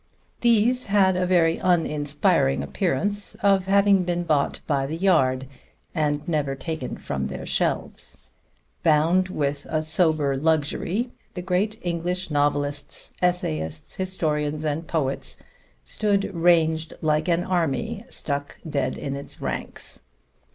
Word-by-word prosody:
These 240 +1 +3
had 195 -2 +4
a 180 0 +1
very 170 -2 +3
uninspiring 145 - +2
appearance 200 - -1
of 195 -2 +3
having 200 -1 +4
been 175 0 -1
bought 150 -4 +1
by 140 -3 0
the 160 +3 -4
yard 135 -9 +3 0.5
and 150 -2 0
never 150 -5 0
taken 135 -1 -5
from 70 -1 -3
their - - -6
shelves. - - -2 0.6
Bound 165 +5 +3
with 145 -4 -2
a 155 0 0
sober 155 -3 +2
luxury, 160 - 0 0.2
the 180 - -4
great 190 +4 0
English 175 +1 -2
novelists, 145 0 -1
essayists, 80 - -1
historians 155 -5 -1
and 155 +2 -2
poets 140 -5 -2 0.5
stood 200 -2 0
ranged 165 -2 +2
like 155 +1 +2
an 175 0 +2
army 185 - -1
struck 145 -1 -4
dead 145 -3 -1
in 140 0 -4
its 140 - -8
ranks. - - -5
160 Hz, 125 wpm, -24 LUFS, 145-185 Hz, 0.6 s, had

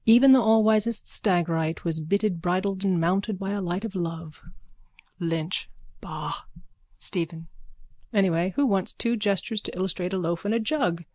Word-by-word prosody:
Even 245 +4 +8
the 265 - +8
allwisest 220 0 +3
Stagyrite 165 -4 0
was 165 -1 0
bitted, 190 +2 0
bridled 190 +2 -1
and 185 -3 +2
mounted 190 +5 0
by 195 +1 -4
a 205 0 -2
light 180 +4 -2
of 220 - -5
love. 165 -4 -5 0.8
LYNCH: 165 0 -2 0.3
Ba! - - -5 0.7
STEPHEN: 165 -2 -2 0.7
Anyway, 185 -4 +2
who 285 - +3
wants 195 -6 +1
two 235 0 0
gestures 210 0 0
to - - -4
illustrate 185 0 -2
a - - 0
loaf 170 -1 -2
and 205 +3 0
a - - +2
jug? 215 - 0
190 Hz, 155 wpm, -26 LUFS, 170-215 Hz, 0.8 s, Even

